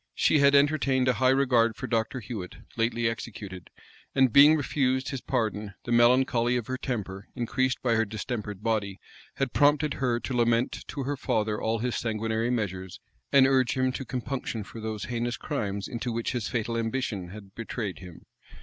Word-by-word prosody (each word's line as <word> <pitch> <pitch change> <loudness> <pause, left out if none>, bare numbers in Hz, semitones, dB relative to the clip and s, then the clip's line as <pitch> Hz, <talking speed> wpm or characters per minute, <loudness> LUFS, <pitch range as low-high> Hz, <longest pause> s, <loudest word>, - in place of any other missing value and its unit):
She 155 - +3
had 140 0 +5
entertained 140 -3 +3
a 125 - +4
high 130 +1 +2
regard 125 -4 +3
for - - -5
Dr. 115 +1 -1
Huet, 105 -5 -6 0.2
lately 115 0 +1
executed; 100 -5 -6 0.5
and 130 -4 +4
being 145 +3 +8
refused 130 -3 0
his 135 -3 -4
pardon, 110 -5 -2
the 120 - -5
melancholy 120 0 +4
of 120 - -3
her 130 +2 -3
temper, 100 -5 -4
increased 130 +1 0
by 120 -2 +2
her 110 0 +3
distempered 105 -1 -5
body, 105 -4 -1 0.4
had 135 -3 -2
prompted 145 0 +3
her 125 -3 0
to 130 - -5
lament 120 0 +1
to 140 - -4
her 145 +2 -2
father 110 -5 -1
all 110 +1 0
his 120 +2 -2
sanguinary 110 0 -1
measures, 95 -6 -3 0.3
and 135 -1 +7
urge 130 -1 +2
him 130 0 +2
to 135 - -5
compunction 125 -3 -4
for 110 +2 -10
those 110 -1 -4
heinous 120 0 -2
crimes 100 -9 -3
into 120 +1 -4
which 115 0 -2
his 120 -4 -2
fatal 115 -1 -2
ambition 115 -5 -2
had 100 +1 -11
betrayed 110 -3 -5
him. 90 -3 -12
120 Hz, 175 wpm, -27 LUFS, 110-130 Hz, 0.5 s, being